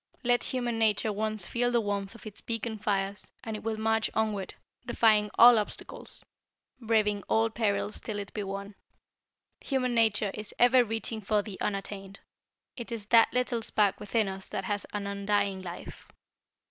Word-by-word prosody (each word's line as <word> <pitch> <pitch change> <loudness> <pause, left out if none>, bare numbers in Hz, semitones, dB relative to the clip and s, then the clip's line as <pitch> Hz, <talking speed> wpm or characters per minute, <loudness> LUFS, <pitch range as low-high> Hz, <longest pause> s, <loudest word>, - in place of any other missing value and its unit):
Let 245 0 +2
human 240 -3 -1
nature 215 -1 +2
once 215 -2 0
feel 245 +5 0
the 240 -1 +2
warmth 205 -1 -3
of 230 - -14
its 210 -1 -7
beacon 230 -1 -3
fires, 200 -1 -2
and 220 -1 -4
it 215 - -6
will 220 0 -2
march 220 0 +1
onward, 210 -3 -1 0.3
defying 215 -3 +3
all 235 -1 +9
obstacles, 210 - -6 0.5
braving 215 -3 +1
all 225 0 +2
perils 205 -2 -1
till 215 -2 -4
it 200 -1 -6
be 210 - -3
won. 200 +1 -5 0.9
Human 255 -3 -1
nature 220 -3 +2
is 210 -1 -7
ever 245 +1 +6
reaching 225 0 -3
for 210 0 +1
the 200 -3 -9
unattained. 195 -1 -4 0.6
It 235 -1 -7
is 225 -3 -5
that 230 -1 +6
little 250 -2 0
spark 205 -2 +2
within 210 +1 0
us 190 0 -6
that 195 - -3
has 205 +1 -2
an 205 -1 -3
undying 200 -1 0
life. 175 -1 -9
215 Hz, 165 wpm, -29 LUFS, 200-225 Hz, 0.9 s, all